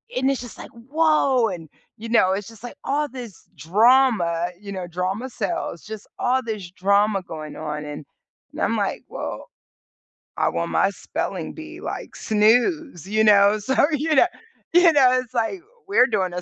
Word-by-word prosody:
and 265 +2 +2
it's 270 - -2
just 245 - -10
like, - - -10
"Whoa!" 270 -1 +2
And, 165 -4 -7 0.3
you 225 - -8
know, 190 -5 +4
it's 200 +1 -4
just, 225 -1 -14
like, 245 - -8
all 295 +2 0
this 240 -7 -10
drama, 200 - +3
you 200 -1 -9
know- 185 -2 -5
drama 185 +8 -3
sells- 335 - -4
just 215 -1 -8
all 255 +1 +2
this 215 -6 -5
drama 200 +2 +2
going 155 -3 -8
on, 150 -1 -5
and 150 0 -7 0.5
and - - -6
I'm - - +1
like, - - -2
"Well, - - -6 0.9
I - - +2
won 85 0 -2
my 80 - +3
spelling - - -5
bee," 320 +1 -10
like, - - -6
snooze. 225 - +1
You 215 +2 +2
know? 205 0 +5
So, 265 +6 -2 0.2
you 305 +1 0
kno 270 - +6 0.5
you 350 -1 +7
know, 260 -3 +5
it's, 250 - -22
like, 240 - -1 0.3
"We're 325 -10 +4
doing 190 -6 -1
a 180 - -4
220 Hz, 175 wpm, -22 LUFS, 185-265 Hz, 0.9 s, you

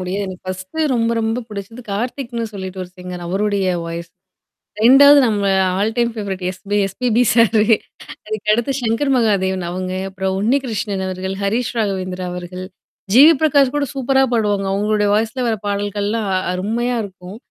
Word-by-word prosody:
முடியாது. 190 +2 -3
எனக்கு 185 -1 -8
பர்ஸ்ட்டு 185 +13 -3
ரொம்ப 230 -1 +1
ரொம்பப் 225 +1 -2
பிடிச்சது 210 +4 -8
கார்த்திக்ன்னு 235 +2 -3
சொல்லிட்டு 190 -1 -6
ஒரு 180 - -15
சிங்கர் 180 -1 -7
அவருடைய 200 +1 0 0.2
வாய்ஸ் 170 0 -6 0.7
2வது 280 +4 +8
நம்ம 205 -2 0 0.4
all 215 +3 0
time 235 -1 +2
favourite 195 -4 -4 0.4
SPB 230 +4 -1 0.2
sir. 230 -1 +4 0.7
அதுக்கடுத்து 215 +4 0
சங்கர் 240 +5 0
மகாதேவன் 190 -6 +1
அவங்க. 185 +1 -4 0.2
அப்புறம் 190 0 -2
உண்ணி 230 +7 +2
கிருஷ்ணன் 205 -4 -3
அவர்கள், 185 +1 -4
ஹரிஷ் 225 +4 -1
ராகவேந்திரா 185 -3 -2
அவர்கள். 180 +1 -7 0.5
ஜி. 255 - +8
வி. - - +8
பிரகாஷ் 285 -3 +3
கூட 290 -1 +1
சூப்பராப் 265 0 +2
பாடுவாங்க. 205 -3 +1
அவங்களுடைய 210 +1 +1
வாய்ஸ்ல 225 +4 0
வர்ற 225 - 0
பாடல்கள்லாம் 205 +1 -2 0.2
அருமையா 225 +7 -1
இருக்கும், 190 0 -10
210 Hz, 145 wpm, -19 LUFS, 190-235 Hz, 0.7 s, 2வது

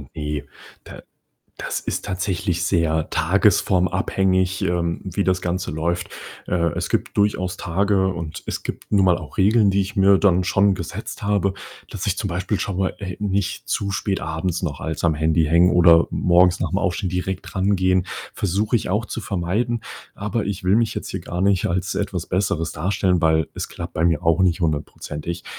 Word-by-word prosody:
Ne, 75 -1 -3 0.4
da - - -11 0.6
das - - -3
ist - - -3
tatsächlich 90 -1 -2
sehr 80 -4 +1
tagesformabhängig, 95 0 +2
ähm, 85 -1 -1
wie 95 +1 -2
das 95 -1 +1
Ganze 90 +1 -2
läuft. 85 +3 -2 0.4
Äh, 85 -2 +1
es - - -2
gibt - - -1
durchaus 95 -3 +1
Tage, 95 +2 +1
und 85 -4 -4
es - - -4
gibt - - -7
nun 100 -2 +4
mal 90 -2 +3
auch 80 - -11
Regeln, 105 +2 +4
die 100 0 +2
ich 95 +3 -5
mir 100 0 +5
dann 95 -2 +3
schon 95 +2 +3
gesetzt - - -6
habe, 100 -2 +1 0.4
dass - - -4
ich - - 0
zum - - -2
Beispiel 95 +4 -2
schon 95 -2 -3
mal, 95 -1 0
äh, 95 -3 -6
nicht 100 -1 -2
zu 100 -1 -1
spät 100 -1 -1
abends 80 +3 -3
noch 75 -5 -3
als 80 -2 -4
am 80 -2 +3
Handy 80 +2 +2
hängen 85 +3 +5
oder 85 -1 +6
morgens 90 0 +3
nach - - -1
'm - - 0
Aufstehen 90 +1 -1
direkt 90 +1 -3
drangehen, 95 -1 +2 0.3
versuche 100 +5 0
ich 110 - -1
auch 105 +5 0
zu 115 - -5
vermeiden. 105 +6 -1 0.3
Aber 105 +2 -2
ich 100 -2 -4
will 95 +2 +3
mich 115 -1 +1
jetzt - - -5
hier - - -4
gar 90 +1 -4
nicht 100 -2 +2
als 90 +1 -1
etwas 95 -4 -3
Besseres 90 -4 -1
darstellen, 90 +1 0
weil 80 -2 +3
es - - -4
klappt - - -7
bei 80 - -1
mir 85 -4 +1
auch 85 +2 +3
nicht 90 -1 +2
hundertprozentig 80 +1 -3
90 Hz, 185 wpm, -22 LUFS, 85-100 Hz, 0.6 s, oder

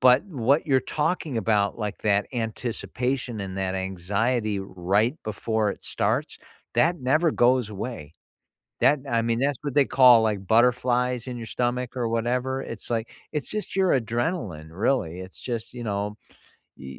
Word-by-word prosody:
but 125 +4 +6
what 140 - +1
you're 135 -2 +3
talking 150 0 -1
about, 105 -1 +1
like 105 -2 -3
that 105 -1 +1
anticipation 120 +1 -3
and 95 -1 -5
that 95 -1 -1
anxiety 100 +4 -1
right 95 +6 0
before 110 0 -1
it - - -9
starts, - - -1 0.4
that 170 +1 +3
never 155 +6 +2
goes 125 -3 +3
away. 100 - -6 0.7
That 145 0 +4
I 115 -1 +1
mean, 115 0 0
that's 140 0 +1
what 145 -2 -4
they 145 -2 +5
call 125 -4 +7
like 105 -3 0
butterflies 125 +3 +2
in 125 - -4
your 115 -1 -6
stomach 125 +1 -2
or 120 -2 0
whatever. 125 +3 -1
It's 115 -2 -7
like, 115 -1 -1 0.2
it's 150 -3 -3
just 215 -2 -2
your 185 -8 +4
adrenaline, 115 - -3
really. 95 -2 0
It's 95 0 -10
just, 120 -1 -4
you 120 -1 -6
know, 105 0 -2 0.6
i - - -14
i - - -9
120 Hz, 160 wpm, -25 LUFS, 105-130 Hz, 0.7 s, call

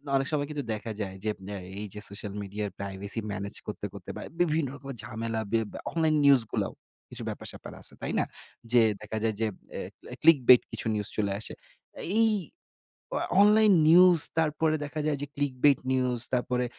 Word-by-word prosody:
অনেক 135 0 +1
সময় 145 -2 0
কিন্তু 145 -1 -3
দেখা 110 +1 -5
যায়, 95 -2 -4
যে 110 - 0 0.5
এই 105 - -4
যে 105 - -7
সোশ্যাল 100 0 -6
মিডিয়ার 100 +1 -4
প্রাইভেসি 100 +2 -1
ম্যানেজ 100 0 -3
করতে, - - -5
করতে - - -10
বা - - -6 0.2
বিভিন্ন 160 -3 +2
রকমের 135 -2 -8
ঝামেলা 115 0 -3
ব্যা 115 -2 -1
অনলাইন 160 -2 +2
নিউজগুলাও 130 -6 +3 0.4
কিছু - - -2
ব্যাপার-স্যাপার - - -8
আছে, - - +2
তাই - - -3
না? - - +3 0.5
যেয়ে 115 -2 +5
দেখা 110 +1 -5
যায় 110 - +1
যে 115 - +1 0.3
অ্যা, - - -4 0.3
অ্যা - - -7
ক্লিক 165 -3 +7
বেট 125 - +10
কিছু - - -4
নিউজ 105 -1 -1
চলে 100 -2 0
আসে। 110 - -5 0.7
এই 225 - +6 0.9
অ - - +1 0.2
অনলাইন 210 0 +6
নিউজ, 175 +1 +7 0.2
তারপরে 155 0 +2
দেখা 155 +2 -5
যায় 150 -2 +1
যে 145 - -4
ক্লিক 145 -2 -1
বেট 145 -3 +6
নিউজ, 125 -2 +1
তারপরে 125 0 +1
125 Hz, 180 wpm, -28 LUFS, 105-150 Hz, 0.9 s, বেট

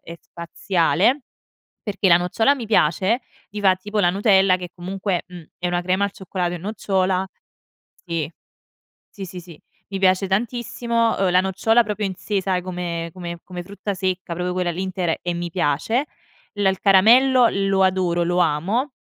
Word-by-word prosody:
è 170 +1 -10
spaziale. 180 - 0 0.6
Perché 200 -2 0
la 170 - +8
nocciola 225 +10 +2
mi 245 -4 -6
piace, 200 +3 +2 0.3
ti 210 - -6
fa 190 -2 +4
tipo 205 +3 -4
la 175 -3 +4
Nutella 195 -1 +4
che 180 -1 -7
comunque, 185 +1 -3
mhmm, 180 -2 -11 0.2
è 180 - -1
una 175 0 0
crema 185 +2 0
al 200 - -5
cioccolato 180 -2 -3
e - - -5
nocciola. 190 -1 -1 0.8
Sì. 165 -3 -3 0.9
Sì, 195 -2 -6
sì, 185 0 -9
sì, 170 -3 -12 0.3
mi 195 -1 -4
piace 190 0 +3
tantissimo, 230 +2 -1
ehm, 195 -2 +1
la 180 +1 +4
nocciola 200 +5 +2
proprio 210 0 -3
in 190 -1 -2
sè 205 +1 -2
sai 185 -1 -1
come 175 -2 -4
come 170 -1 -7
come 180 -1 -7
frutta 200 +2 -5
secca, 185 -2 -3
proprio 180 +1 -2
quella 180 -1 -1
lì 180 +3 -4
intera 185 -3 -1
e 175 -1 -2
mi 175 0 -4
piace. 185 - 0 0.5
L 205 -1 -1
il 190 -1 +1
caramello 240 +6 +6
lo 195 -1 +1
adoro, 180 -2 +1
lo 175 +1 0
amo. 185 - 0
185 Hz, 175 wpm, -22 LUFS, 175-205 Hz, 0.9 s, la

